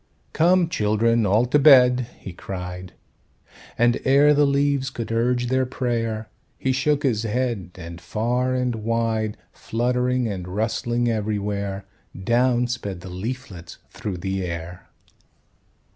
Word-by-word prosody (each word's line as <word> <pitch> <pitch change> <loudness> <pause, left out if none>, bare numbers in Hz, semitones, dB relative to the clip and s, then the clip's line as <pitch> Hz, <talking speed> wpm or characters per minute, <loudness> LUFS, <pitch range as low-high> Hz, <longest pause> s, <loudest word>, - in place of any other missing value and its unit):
"Come, 175 +2 +4
children, 110 -3 +1
all 105 +5 +3
to 135 +4 +2
bed," 125 -4 +6
he 95 - -9
cried; 90 0 -7 0.8
And 120 0 +3
ere 140 +3 +5
the 145 0 +4
leaves 140 -1 +1
could 115 -3 -6
urge 120 +2 +1
their 130 +1 +1
prayer, 115 -4 -2 0.3
He 130 - 0
shook 145 +3 +1
his 120 -6 +1
head, 115 -4 -2
and 85 -1 -9
far 125 +5 -1
and 125 -2 -1
wide, 110 -1 -1
Fluttering 125 +1 -1
and 95 -4 -5
rustling 115 +4 -1
everywhere, 100 -3 -2 0.3
Down 120 +4 +2
sped 100 -7 -4
the 90 - -9
leaflets 95 -4 -6
through 100 -4 -5
the 95 +1 -3
air. 85 0 -6
115 Hz, 130 wpm, -23 LUFS, 100-125 Hz, 0.8 s, bed